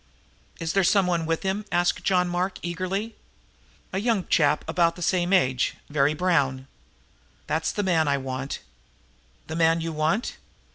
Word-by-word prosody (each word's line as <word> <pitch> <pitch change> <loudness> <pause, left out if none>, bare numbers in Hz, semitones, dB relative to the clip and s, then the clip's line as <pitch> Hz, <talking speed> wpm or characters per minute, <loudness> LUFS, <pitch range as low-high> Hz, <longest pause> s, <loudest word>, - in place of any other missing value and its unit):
"Is 165 -1 -2
there 195 - +3
someone 180 -3 +2
with 165 0 -1
him?" 195 +2 -1
asked 175 0 +1
John 180 -2 +2
Mark 180 +2 -1
eagerly. 185 +6 -3 0.8
"A 190 - 0
young 220 -3 0
chap 150 -2 +2
about 170 0 +2
the 175 - -6
same 175 +1 +1
age 130 -10 +2 0.2
very 145 +1 +2
brown." 140 -7 +1 0.8
"That's 160 +1 -1
the 205 - -2
man 165 -5 +2
I 140 0 +2
want!" 135 +1 -4 0.8
"The 160 - -6
man 165 0 +3
you 165 0 -3
want?" 160 +10 -1
170 Hz, 150 wpm, -25 LUFS, 155-185 Hz, 0.8 s, there